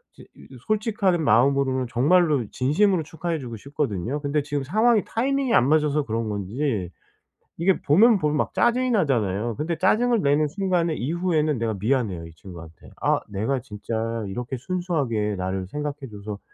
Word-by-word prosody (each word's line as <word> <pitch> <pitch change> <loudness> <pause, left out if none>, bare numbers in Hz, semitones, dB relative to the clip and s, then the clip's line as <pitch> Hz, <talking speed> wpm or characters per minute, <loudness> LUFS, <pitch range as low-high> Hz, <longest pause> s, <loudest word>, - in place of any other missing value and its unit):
제 - - -14
이 - - -15
저 130 - -11
솔직한 205 -5 +1
마음으로는 130 -1 +2
정말로 145 +1 +3
진심으로 170 +7 +2
축하해 160 +2 -4
주고 120 -4 -7
싶거든요. 135 - -3
근데 145 0 0
지금 145 -1 -3
상황이 215 - +3
타이밍이 265 +1 0
안 125 - +4
맞아서 150 -1 +2
그런 115 0 -2
건지 105 - -2 0.7
이게 180 +3 +2
보면 215 +10 +5
보면 150 -2 0
막 - - -1
짜증이 250 +2 +2
나잖아요. 115 - 0
근데 160 +3 -2
짜증을 225 +6 +2
내는 145 +1 +2
순간에 175 -1 0
이후에는 155 0 0
내가 115 -2 -1
미안해요, 105 -7 -1
이 80 - -14
친구한테. 85 -2 -12
아 - - +2
내가 110 +7 -1
진짜 115 -1 -4
이렇게 125 +6 -5
순수하게 135 - -2
나를 95 0 -3
생각해 150 +6 -4
줘서 105 0 -7
145 Hz, 375 characters per minute, -24 LUFS, 115-175 Hz, 0.7 s, 보면